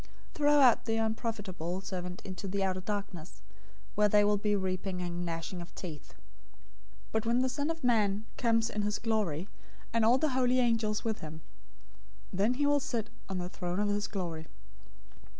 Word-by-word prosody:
025:030 - - -26
Throw 295 -1 +4
out 250 -4 +6
the 225 -1 0
unprofitable 205 -6 -2
servant 180 -2 -5
into 190 0 -5
the 195 +1 0
outer 185 -1 0
darkness, 190 -4 -5 0.5
where 210 0 +4
there 205 0 +5
will 210 0 +4
be 210 +1 +1
weeping 185 -1 -2
and 175 0 -3
gnashing 170 +1 -4
of 170 - -11
teeth.' 160 -6 -8 0.9
025:031 - - -27
"But 220 0 0
when 240 +2 +3
the 260 - +1
Son 285 +4 -1
of 325 -1 -3
Man 215 -3 +2
comes 230 -1 +2
in 210 - -1
his 210 0 0
glory, 200 -7 0 0.5
and 230 -1 +3
all 235 +3 +6
the 310 +3 +1
holy 255 -1 +2
angels 225 -3 +1
with 220 -1 -1
him, 160 0 -8 0.9
then 205 +7 +2
he 290 +2 +1
will 290 0 +4
sit 235 -5 -3 0.2
on 190 - -2
the 180 -1 -2
throne 180 0 -3
of 205 0 +2
his 205 0 0
glory. 170 -5 -4
205 Hz, 185 wpm, -31 LUFS, 185-230 Hz, 0.9 s, out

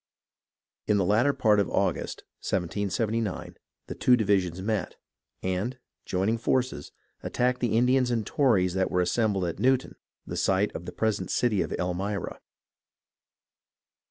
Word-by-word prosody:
In 105 - +3
the 95 - +2
latter 110 +9 +3
part 110 -6 +3
of 100 - +1
August, - - -1 0.2
1779, 100 +4 -2 0.3
the - - -6
two 125 -1 +4
divisions 95 -5 +1
met, 105 -1 -2 0.5
and, 95 +8 -2 0.3
joining 100 +5 0
forces, 125 - -1 0.3
attacked 125 +1 0
the 115 -3 +1
Indians 125 +1 +3
and 120 -2 +1
the - - -8
Tories 100 -11 +3
that 95 0 +1
were 90 - +1
assembled 95 +1 +1
at 85 - -4
Newtown, 130 0 +2 0.3
the - - -5
site 95 +2 +1
of 85 - -6
the - - -4
present 110 -2 -1
city 110 -6 +1
of - - -3
Elmira. 95 +2 -3
105 Hz, 140 wpm, -27 LUFS, 95-120 Hz, 0.5 s, two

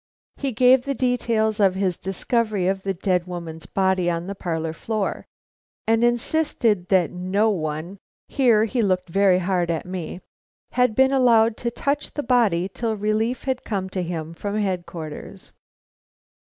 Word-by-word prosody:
He 275 -1 -2
gave 250 +2 +5
the 275 0 -1
details 230 -4 0
of 195 -2 +4
his 190 -2 0
discovery 205 +1 -1
of 195 0 0
the 195 0 -2
dead 180 -1 0
woman's 170 -2 -7
body 190 -2 +1
on 170 0 -2
the 200 - -4
parlor 165 -4 -3
floor, 215 +2 -3 0.6
and 225 +1 +2
insisted 240 - +1
that 185 -4 +3
no 190 +5 +1
one 160 +1 -4 0.3
here 235 -5 +3
he 240 +2 -1
looked 185 -3 0
very 195 +1 +4
hard 180 -1 0
at 165 -2 -2
me 180 -1 -5 0.5
had 250 -3 +2
been 265 0 +4
allowed 230 -4 +4
to 235 - -2
touch 280 +4 -2
the 290 - -2
body 220 -8 +2
till 220 +2 -3
relief 215 +4 -1
had 260 -1 -2
come 190 -3 -3
to 190 - -2
him 165 -2 -4
from 205 +5 -4
Headquarters. 175 -6 -5
200 Hz, 155 wpm, -23 LUFS, 180-230 Hz, 0.6 s, gave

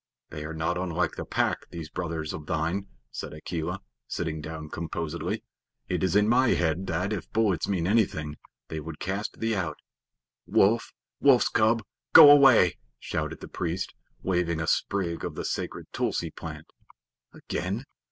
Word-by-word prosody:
"They 75 -1 -6
are 80 - -5
not 80 +2 -1
unlike 90 -2 0
the - - -5
Pack, - - -1
these 85 -2 -6
brothers 80 -3 -3
of 75 0 -7
thine," 85 +6 -1 0.2
said - - -6
Akela, 85 +4 -4 0.3
sitting 80 -2 -3
down 75 0 -7
composedly. 80 -1 -3 0.5
"It - - 0
is 95 -1 +1
in 105 0 +5
my 125 +2 +4
head 85 +2 0
that, 90 +4 -1
if 90 -6 -5
bullets 105 -7 +1
mean 90 -4 0
anything, 90 -8 +1 0.3
they 80 - -4
would 80 0 -7
cast 100 +3 -3
thee 115 0 0
out." 85 -7 -2 0.7
"Wolf! 115 +4 +3 0.3
Wolf's 135 -3 +5
cub! 110 +1 +3 0.3
Go 150 -3 +12
away!" 135 - +6 0.2
shouted - - -3
the - - -7
priest, 90 +2 -3 0.3
waving 90 -3 0
a 80 - -1
sprig 85 -1 0
of - - -4
the - - -4
sacred - - -3
tulsi - - -1
plant. - - -8 0.7
"Again? 95 +7 -4
90 Hz, 155 wpm, -27 LUFS, 80-100 Hz, 0.7 s, Go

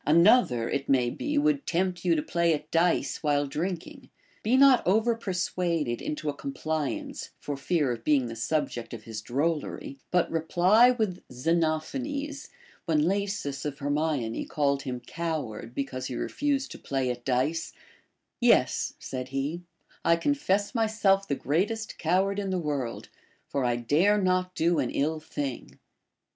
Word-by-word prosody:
Another, 165 - +5
it 140 0 -2
may 125 -3 +3
be, 295 - -2
would 290 -1 +2
tempt 180 +1 0
you 175 -2 +3
to 150 - 0
play 170 -2 +2
at 150 +1 -9
dice 170 +1 +1
while 145 -2 +2
drinking; 180 - -4 0.3
be 240 +4 +3
riot 270 -2 +7
over 220 +5 +3
persuaded 180 - -1
into 150 0 -4
a 145 - 0
compliance, 150 +1 -3
for 145 - -4
fear 140 0 0
of 115 -1 -5
being 140 -3 +3
the 115 -1 -5
subject 120 -2 -2
of 110 - -11
his 110 -1 -6
drollery, 140 +2 -2
but 180 -1 +2
reply 180 +8 +5
with 215 -7 -1
Xenophanes, 170 - -1 0.4
when 155 -2 +2
Lasus 195 -8 -2
of 145 -2 -4
Hermione 145 -5 -1
called 140 -3 0
him 125 -2 -4
coward 130 -7 -4
because 130 -2 -3
he 125 - -5
refused 280 - -1
to - - -8
play 135 -2 -1
at 120 0 -7
dice: 135 +6 0 0.7
Yes, - - +3
said 130 -1 -5
he, 140 +6 -3 0.4
I 170 - +5
confess 205 - 0
myself 215 -4 +2
the 140 - 0
greatest 210 +12 -1
cow 180 +4 +3
ard 200 +1 -2
in 200 -1 -2
the 185 - 0
world, 145 -8 -3 0.4
for 140 - -1
I 120 -1 +2
dare 160 - +3
not 185 -1 +1
do 170 0 +2
an 130 -4 0
ill 155 +3 0
thing. 145 -4 -5
160 Hz, 155 wpm, -28 LUFS, 140-195 Hz, 0.7 s, riot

